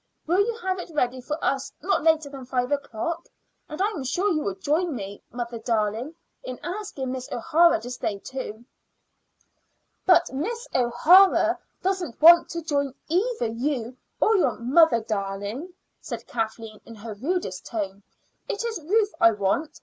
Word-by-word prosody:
Will 350 +4 +2
you 450 +3 +2
have 375 0 -1
it 360 - -7
ready 255 -2 0
for 300 +4 -3
us 275 0 0
not 380 +6 +1
later 315 -1 +3
than 275 -2 -9
five 250 0 -1
o'clock? 285 +4 -3 0.4
And 305 - -7
I 390 - +3
am 330 -11 -5
sure 360 +11 0
you 310 -3 +1
will 200 -8 -2
join 310 - 0
me, 200 -2 -7
mother 235 -1 -5
darling, 225 +5 -1 0.3
in 255 -1 -6
asking 355 -9 -4
Miss 255 -1 -6
O'Hara 330 +4 +4
to 245 +2 -7
stay, 215 -4 -3
too." 235 0 -7 1.4
"But 350 -6 +5
Miss 465 - -3
O'Hara 300 +11 +5 0.2
doesn't 370 -8 -2
want 340 +2 +8
to 335 0 -5
join 280 -3 -1
either 395 - +1
you 245 0 -2 0.2
or 440 - +4
your 365 - +1
'mother 260 +1 +4
darling,'" 205 - -4 0.3
said - - -7
Kathleen 225 -1 -4
in 230 - -12
her 215 +1 -7
rudest 255 - -3
tone. 200 -3 -4 0.5
"It 420 +3 -2
is 445 -7 -3
Ruth 415 +6 +1
I 230 0 +7
want. 205 +10 -1
275 Hz, 160 wpm, -25 LUFS, 230-345 Hz, 1.4 s, want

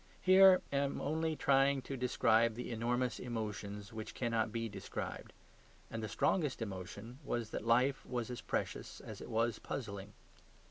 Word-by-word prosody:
Here 190 0 +8
I - - +2
am 140 0 0
only 160 +2 0
trying 135 -1 +3
to 135 - -4
describe 115 -3 +3
the 125 +1 -5
enormous 120 0 0
emotions 105 -3 -5
which 110 -1 -6
cannot 115 -3 0
be 115 0 -2
described. 100 -3 -6 0.6
And 110 - -3
the 110 - -4
strongest 150 - +1
emotion 105 +3 -6
was 120 -5 -2
that - - -3
life 125 +4 +3
was 120 -1 -2
as 125 - -5
precious - - -3
as - - -8
it - - -8
was 115 0 +1
puzzling. 100 -5 -5
120 Hz, 155 wpm, -35 LUFS, 110-135 Hz, 0.6 s, Here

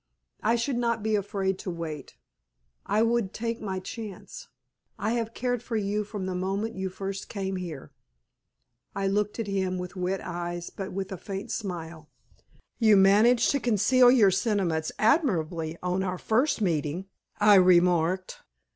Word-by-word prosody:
I 225 +2 +2
should 240 +2 -1
not 235 -2 0
be 220 0 +1
afraid 195 -1 -1
to - - -5
wait. 165 -4 -6 0.7
I 215 - +2
would 230 -4 0
take 230 +1 -3
my 190 -3 -3
chance. 225 - -8 0.5
I 215 - -1
have 230 -1 -2
cared 245 -2 -1
for 240 -1 -5
you 210 0 0
from 205 -2 -6
the 185 - -3
moment 195 +4 -2
you 190 0 -3
first 195 +1 -6
came 195 -2 -3
here." 170 -7 -7 1.0
I 195 0 -1
looked 205 +1 0
up - - +2
at 220 - -5
him 190 -1 0
with 180 +1 -6
wet 185 +1 -1
eyes, 175 0 -5
but 195 -1 -6
with 190 +1 -4
a 190 - -4
faint 195 +2 -6
smile. 170 -6 -5 0.7
"You 215 -3 +6
managed 215 +5 +5
to 280 - +1
conceal 245 +2 +4
your 225 -6 +6
sentiments 180 -7 0
admirably 170 - +1
on 180 +1 0
our 185 -1 -2
first 230 +7 +1
meeting," 165 0 -1 0.3
I 210 0 +6
remarked. 180 -1 +3
195 Hz, 160 wpm, -27 LUFS, 180-225 Hz, 1.0 s, You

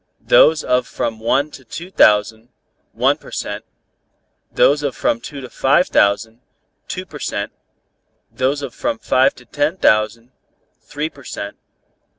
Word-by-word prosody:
those - - +5
of 125 -1 +1
from 110 -1 -3
one 135 +6 +1
to 135 - -12
two 170 +9 -9
thousand, 110 - +3 0.4
one - - +1
per - - -14
cent.; - - -5 0.9
those 145 +1 +3
of 140 -4 -2
from 115 - 0
two 140 +2 -8
to 130 - -7
five 140 +8 +2
thousand, 110 +4 +1 0.5
two - - -5
per - - -11
cent.; - - -3 0.8
those 135 +3 -1
of 135 - -6
from 295 -1 -2
five 135 -10 +2
to 125 - -16
ten 150 +7 -1
thousand, 110 - +1 0.5
three 150 +2 -4
per 145 -3 -15
cent. 100 -4 -6
130 Hz, 150 wpm, -19 LUFS, 115-145 Hz, 0.9 s, those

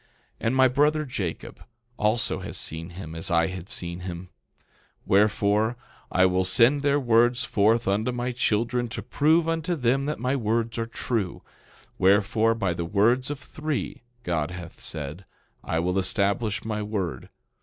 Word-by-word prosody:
11:3 - - -35 0.4
And 120 - +1
my 130 0 +6
brother, 150 +4 +2
Jacob, 100 - -5 0.3
also 110 +1 +1
has - - -7
seen 80 +2 -4
him 85 -3 -8
as 80 +4 -3
I 85 -1 +3
have 95 0 -8
seen 85 0 -4
him; 90 0 -7 0.7
wherefore, 105 +3 +2 0.3
I 95 - +4
will 95 0 +2
send 115 +9 +4
their 145 0 +2
words 120 0 +3
forth 110 +2 +2
unto 105 +5 +1
my 125 +1 -2
children 120 0 0
to 120 - -6
prove 160 +3 +2
unto 165 +1 -1
them 135 0 +1
that 150 - -2
my 125 +4 0
words 115 -1 -1
are 115 - -2
true. 115 -5 -3 0.6
Wherefore, 110 +4 +3
by 95 -6 0
the 85 0 -3
words 115 +9 +2
of 145 - -3
three, 150 +1 -4 0.2
God 80 -6 -1
hath 90 -2 -9
said, 75 +3 -6 0.4
I 80 - -2
will 90 +3 +1
establish 100 +2 0
my 105 -1 -2
word. 95 -10 -4
110 Hz, 160 wpm, -25 LUFS, 95-125 Hz, 0.7 s, my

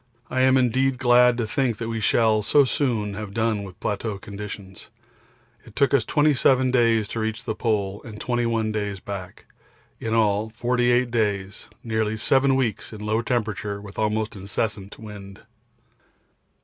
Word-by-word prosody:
I 130 - +1
am 130 0 +5
indeed 130 +1 +2
glad 125 -1 +5
to 120 - 0
think 115 +1 -1
we 115 -1 -3
shall 110 0 +3
so 140 +8 +4
soon 115 -7 -1
have 100 -1 -7
done 110 -2 +1
with 95 -3 -10
plateau 105 0 -3
conditions. 100 -1 -9 0.7
It 115 -3 -16
took 140 0 +2
us 135 -5 +4
27 135 -3 +3
days 115 -4 +3
to 115 - -4
reach 110 +2 -3
the 110 - -2
Pole 105 -3 -1
and 105 -2 -9
21 115 -3 0
days 105 -2 -3
back 95 -1 -8 0.5
in 115 0 -2
all 105 -1 +2
48 120 +1 +1
days 100 -4 -1 0.2
nearly 110 -1 -1
7 135 +4 +3
weeks 120 -6 -1
in 110 -2 -9
low 110 +2 0
temperature 110 -4 -2
with 100 0 -10
almost 110 0 -1
incessant 100 +1 -3
wind. 100 -3 -10
110 Hz, 150 wpm, -24 LUFS, 105-120 Hz, 0.7 s, am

